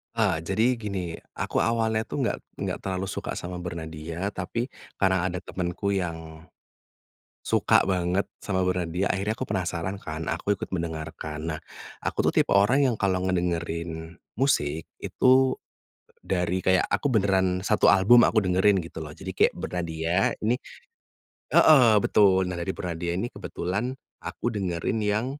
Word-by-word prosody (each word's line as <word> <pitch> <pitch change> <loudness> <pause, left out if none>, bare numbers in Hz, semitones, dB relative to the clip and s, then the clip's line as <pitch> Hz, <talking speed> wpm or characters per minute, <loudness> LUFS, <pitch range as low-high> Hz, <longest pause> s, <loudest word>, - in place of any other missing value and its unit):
Eee, 105 -7 +2
jadi 100 +6 +1
gini, 100 -4 -3 0.3
aku - - -1
awalnya 115 -1 +1
tuh - - -2
nggak - - 0 0.2
nggak - - -2
terlalu 95 0 -3
suka - - -4
sama 90 0 -5
Bernadya, 85 +1 -5
tapi 115 +7 -4 0.2
karena 95 -2 +2
ada 90 -1 -3
temenku 90 +2 -3
yang, 80 -4 -4 1.0
suka - - +3
banget 90 0 0 0.2
sama 95 -2 0
Bernadya, 90 0 -1
akhirnya 100 +4 -1
aku 130 - -3
penasaran 95 -2 -3
kan. 80 0 -5
Aku 100 -1 -1
ikut - - -4
mendengarkan. 80 -2 -4
Nah, 75 - -5 0.4
aku - - -1
tuh - - +2
tipe - - -4
orang 105 +8 +4
yang 120 - -1
kalau 95 -2 +1
ngedengerin 85 -2 -2 0.2
musik, 80 - 0
itu 130 +1 +3 0.7
dari 90 0 -1
kayak 95 -1 +3
aku 145 - 0
beneran 95 -4 +2
satu 100 +3 +4
album 105 +5 +6
aku 110 - +4
dengerin 95 +1 +3
gitu 80 -2 -7
loh, 75 - -8
jadi 95 +5 -7
kayak - - +4
Bernadya, 85 +1 -1
ini 115 +3 +1 1.0
heeh, 125 -8 +7
betul. 95 -3 +4
Nah 90 - -4
dari 85 +2 -3
Bernadya 85 -1 -3
ini 115 +7 -2
kebetulan 105 +9 -3 0.2
aku 120 - -4
dengerin 95 -1 -2
yang 105 +2 0
95 Hz, 145 wpm, -26 LUFS, 85-105 Hz, 1.0 s, heeh